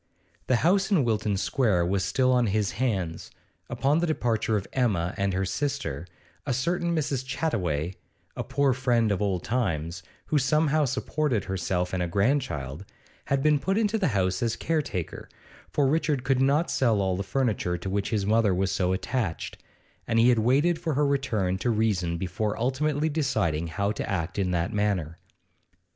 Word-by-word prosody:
The 130 - +3
house 195 +3 +3
in 185 -9 +3
Wilton 105 -3 0
Square 100 -5 +1
was 95 +1 0
still 130 +7 +2
on 125 -2 +3
his 105 -1 0
hands; 95 -10 -2 0.4
upon 145 +4 +1
the 175 - 0
departure 115 -7 0
of 100 - -4
Emma 100 -8 +1
and 100 -1 0
her 95 +1 0
sister; 135 - -3 0.4
a 125 - -1
certain 170 +5 0
Mrs. 140 -4 -1
Chattaway, 95 - -1 0.4
a - - -3
poor 140 0 +1
friend 120 -3 +1
of 100 - -1
old 95 -4 0
times, 90 -8 -1 0.2
who 150 - +1
somehow 150 +2 +2
supported 135 -2 -1
herself 90 -1 -2
and 90 - 0
a 90 - 0
grandchild, 100 - -1 0.4
had 135 0 0
been 150 -1 +4
put 190 +9 0
into 220 0 +1
the 190 - +2
house 95 -6 0
as 115 -2 0
caretaker, 150 - -3 0.4
for 145 - +1
Richard 145 -2 +1
could 130 0 +1
not 145 +5 +2
sell 115 -5 +2
all 95 -1 +1
the 95 - -3
furniture 105 -7 -1
to 90 - -7
which 100 +1 -1
his 105 -3 0
mother 105 -2 +3
was 95 +1 0
so 90 0 +1
attached, 95 -3 -3 0.5
and 115 - +1
he 115 +2 +6
had 120 -2 +4
waited 145 +9 +2
for 165 -4 -2
her 145 +1 +2
return 110 -10 0
to 120 - 0
reason 100 -7 +1
before 95 +4 -2
ultimately 145 +5 0
deciding 125 - 0
how 100 +5 -1
to 110 - -4
act 90 0 -2
in 95 -2 +1
that 90 +4 -1
matter. 95 -6 -1
115 Hz, 175 wpm, -26 LUFS, 95-140 Hz, 0.5 s, he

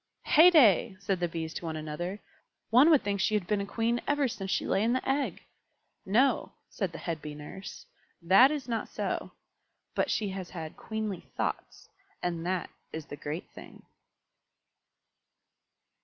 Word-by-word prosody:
"Heyday!" 295 - +6
said 195 -2 -1
the 175 - +1
Bees 160 -1 -5
to - - -6
one 160 -1 -3
another. 155 +6 -4 0.5
"One 255 +7 +7
would 305 -5 +5
think 200 -1 -1
she 215 - +2
had 205 -4 0
been 205 +2 0
a 200 - -4
Queen 230 +2 0
ever 290 -1 +2
since 195 -5 -5
she - - 0
lay 195 - +1
in 230 +3 +2
the 255 - -2
egg." 275 +1 -1 0.6
"No," 245 +8 +2 0.2
said - - -2
the - - -8
head 165 -3 -4
Bee 150 -1 -7
Nurse; 170 - -9 0.3
"that 190 +10 +6
is 290 -4 -3
not 230 -2 -2
so. - - -3 0.6
But - - 0
she 210 -2 0
has 190 -2 -6
had 160 -3 -7
queenly 220 -4 -4 0.2
thoughts, - - -3 0.4
and 170 -2 -2
that 185 -1 -2 0.2
is 160 -2 -6
the - - -8
great 150 +4 -5
thing." - - -13
195 Hz, 165 wpm, -29 LUFS, 170-235 Hz, 0.6 s, One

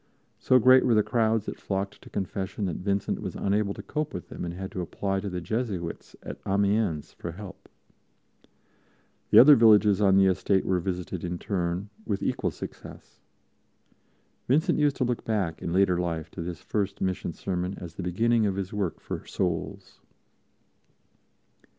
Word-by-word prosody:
So 130 - +4
great 130 +2 +6
were 120 - +3
the 105 - +4
crowds 110 -2 +1
that - - -6
flocked 100 0 -3
to - - -14
Confession 95 +1 -3
that 90 -4 -2
Vincent 100 +1 -1
was - - -5
unable 100 0 0
to - - -8
cope 150 0 -3
with 90 - -7
them - - -7
and 85 - -3
had 95 +1 -6
to 90 - -4
apply 95 +3 -2
to 100 +1 -4
the 90 -1 -4
Jesuits 95 -3 -4
at - - -7
Amiens 100 -5 0
for 85 - -7
help. 100 +1 -11 1.6
The - - +5
other 145 +3 +10
villages 105 -3 +5
on 95 -2 +5
the 95 - +6
estate 95 +1 +2
were 95 -1 +1
visited 90 0 -4
in 90 0 -3
turn, 90 +1 -2
with 100 -3 -2
equal - - 0
success. - - -10 1.3
Vincent 145 +5 +2
used 145 -2 +3
to - - 0
look 125 -1 -1
back 100 -7 -1
in - - -3
later 90 -1 +3
life 85 -3 -3
to 90 - -7
this 85 0 -6
first 100 -2 -2
mission 95 -2 -2
sermon 90 +2 -3
as 85 -2 -8
the 95 - -6
beginning 110 +5 +2
of 95 - -1
his 95 0 -4
work 100 -5 -2
for - - -6
souls. 85 -4 -3
95 Hz, 170 wpm, -27 LUFS, 90-105 Hz, 1.6 s, other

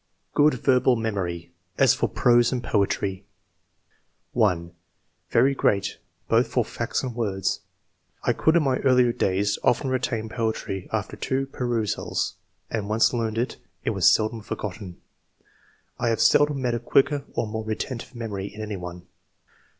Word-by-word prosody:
Good 150 -1 +4
verbal 130 0 +3
memory, 95 -7 -3 0.3
as - - +5
for - - 0
p7ose 120 -1 +4
and 125 -2 -2
poetry. 100 -3 0 1.1
1. 90 -7 +1 0.3
" - - -46
Very 130 +4 +4
great, 100 -6 0 0.3
both - - +3
for - - 0
facts - - -3
and 125 -2 -3
words; 100 -5 -1 0.6
I - - +2
could 160 - +2
in 170 - +4
my 130 -2 +2
earlier 125 -2 +4
days 100 0 0
often 130 +2 +2
retain 120 -3 -1
poetry 110 -4 -3
after - - -2
two 135 +1 -1
perusals, 120 -6 -2 0.4
and 105 -3 -2
once 110 +3 +3
learned, 115 +1 -1 0.3
it - - 0
was - - +5
seldom 110 +1 +1
forgotten. 100 -3 -6 1.0
I 120 - +1
have 115 - 0
seldom 145 +5 +4
met 120 -1 +1
a 120 - -1
quicker 140 +4 +2
or - - 0
more 110 +1 -4
retentive 115 +3 -5
memory 105 -4 -4
in 105 - -11
any 105 -2 -4
one." 90 0 -8
115 Hz, 150 wpm, -25 LUFS, 100-125 Hz, 1.1 s, as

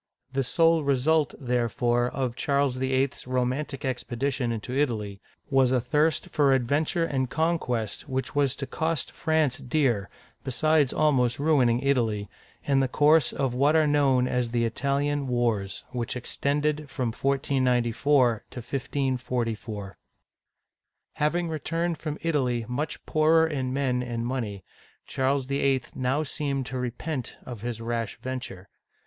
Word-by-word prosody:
The 135 - +1
sole 165 +5 +3
result, 145 +3 +2
therefore, 120 -1 +1
of 130 -3 -2
Charles 140 -1 +1
VIII. 130 +1 +1
's - - -13
romantic 130 +3 -1
expedition 125 0 -2
into 115 +3 -4
Italy, 110 -8 -1 0.3
was 135 -2 +4
a 130 - +3
thirst 150 +6 +1
for 140 -2 +4
adventure 150 +7 +1
and 130 -5 -1
con 160 +3 +1
quest 120 +1 -3
which 130 0 -2
was 140 -3 +1
to 140 - -4
cost 160 +1 -1
France 155 -5 +1
dear, 120 -7 0 0.3
besides 145 +2 +2
almost 130 -6 +2
ruin 145 -4 +3
ing 120 +1 +1
Italy, 115 -7 +1 0.4
in 140 -1 +2
the 135 - +2
course 150 +1 +4
of 135 -3 -1
what 140 +5 +3
are 160 -1 +5
known 140 -4 +3
as 125 -2 0
the 115 0 +1
Italian 140 +4 0
Wars, 115 -6 -1
which 120 -2 -3
extended 145 +4 -1
from 125 -4 -2
1494 130 -2 +2
to - - -13
1544. 120 -5 -3 1.1
Having 165 +3 0
returned 165 +1 -2
from 155 -2 -4
Italy 130 -8 0
much 145 +5 -3
poorer 160 +1 +4
in 135 -5 -2
men 130 -2 0
and 120 -1 -3
money, 115 -7 -3 0.4
Charles 135 0 0
VIII. 135 -1 +1
now 130 +4 0
seemed 140 -2 -2
to 130 0 -4
repent 125 +2 -4
of 120 -5 -7
his 120 -1 -4
rash 115 -2 -3
venture. 125 -7 -6
130 Hz, 140 wpm, -26 LUFS, 120-145 Hz, 1.1 s, are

